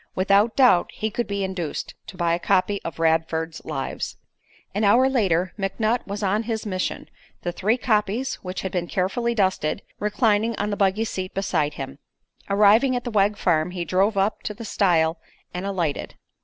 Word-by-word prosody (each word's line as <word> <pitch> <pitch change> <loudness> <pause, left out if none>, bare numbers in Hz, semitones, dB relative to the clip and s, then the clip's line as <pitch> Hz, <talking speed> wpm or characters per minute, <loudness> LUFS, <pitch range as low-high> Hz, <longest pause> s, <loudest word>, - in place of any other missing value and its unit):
Without 200 +4 +3
doubt 250 -10 +5
he 220 0 -3
could 240 +3 -2
be 200 -1 -2
induced 185 -5 -4
to 185 - -10
buy 170 -2 +1
a 170 - 0
copy 195 +2 +1
of 165 - -6
Radford's 160 0 0
Lives. 135 -4 -4 0.6
An 205 +3 -1
hour 235 +6 +5
later 190 -9 +1
McNutt 215 +4 0
was 205 +1 -4
on 200 +2 +1
his 225 -1 -3
mission, 185 -3 -3 0.4
the 175 - -1
three 210 +7 +1
copies, 220 +2 0
which 185 0 -5
had 190 - -4
been 175 -2 -2
carefully 235 +7 -1
dusted, 185 -7 0 0.2
reclining 210 +1 +1
on 210 0 -2
the - - 0
buggy 200 +2 +1
seat 185 -4 -5
beside 160 -6 0
him. 135 +1 -7 0.5
Arrived 205 +4 +5
at 245 - -2
the 240 - -4
Wegg 205 -1 +2
farm, 165 -3 +1
he 180 -1 -4
drove 195 +5 +1
up 195 +2 +1
to 210 - -5
the 230 - -8
stile 165 -6 +2 0.3
and 180 +2 -4
alighted. 175 -7 -2
195 Hz, 180 wpm, -24 LUFS, 175-215 Hz, 0.6 s, doubt